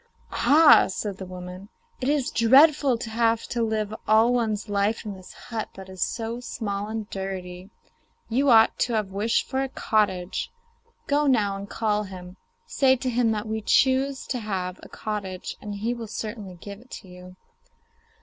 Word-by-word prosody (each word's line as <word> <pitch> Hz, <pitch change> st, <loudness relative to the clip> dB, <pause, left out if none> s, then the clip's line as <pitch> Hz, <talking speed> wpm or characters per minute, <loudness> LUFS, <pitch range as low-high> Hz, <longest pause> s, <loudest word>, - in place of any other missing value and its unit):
'Ah!' 305 Hz, +1 st, +6 dB
said 195 Hz, +1 st, -4 dB
the 190 Hz, -, -6 dB
woman, 180 Hz, +2 st, -9 dB, 0.3 s
'it's 275 Hz, 0 st, 0 dB
dreadful 270 Hz, +2 st, +5 dB
to 225 Hz, -1 st, -6 dB
have 230 Hz, 0 st, +2 dB
to 235 Hz, -, -3 dB
live 215 Hz, -2 st, -1 dB
all 220 Hz, +3 st, +5 dB
one's 220 Hz, -3 st, -1 dB
life 205 Hz, +2 st, 0 dB
in 210 Hz, -, -4 dB
this 185 Hz, -1 st, -12 dB
hut 225 Hz, -3 st, -6 dB
that 190 Hz, 0 st, -10 dB
is 185 Hz, -1 st, -9 dB
so 230 Hz, +1 st, -2 dB
small 205 Hz, -4 st, -4 dB
and 220 Hz, -1 st, -4 dB
dirty; 185 Hz, -1 st, -6 dB, 0.6 s
you 270 Hz, +5 st, +1 dB
ought 225 Hz, -2 st, +6 dB
to 245 Hz, -, +1 dB
have 210 Hz, -3 st, -1 dB
wished 210 Hz, +4 st, 0 dB
for 265 Hz, 0 st, -1 dB
a 270 Hz, -, -2 dB
cottage. 200 Hz, -7 st, 0 dB, 0.6 s
Go 290 Hz, +1 st, +2 dB
now 210 Hz, -7 st, +2 dB
and 200 Hz, +1 st, -7 dB
call 210 Hz, -2 st, 0 dB
him; 185 Hz, -1 st, -10 dB, 0.3 s
say 270 Hz, -, +3 dB
to 255 Hz, 0 st, -3 dB
him 240 Hz, -1 st, +2 dB
that 215 Hz, 0 st, -4 dB
we 220 Hz, 0 st, -2 dB
choose 265 Hz, +4 st, +2 dB
to 250 Hz, -, -3 dB
have 190 Hz, -4 st, -4 dB
a -, -, -12 dB
cottage, 200 Hz, -4 st, -5 dB
and 205 Hz, -1 st, -6 dB
he 220 Hz, +4 st, -1 dB
will 235 Hz, -2 st, -7 dB
certainly 210 Hz, -3 st, -6 dB
give 200 Hz, +3 st, -10 dB
it 245 Hz, -1 st, -11 dB
you. 180 Hz, 0 st, -13 dB
215 Hz, 170 wpm, -25 LUFS, 195-240 Hz, 0.6 s, Ah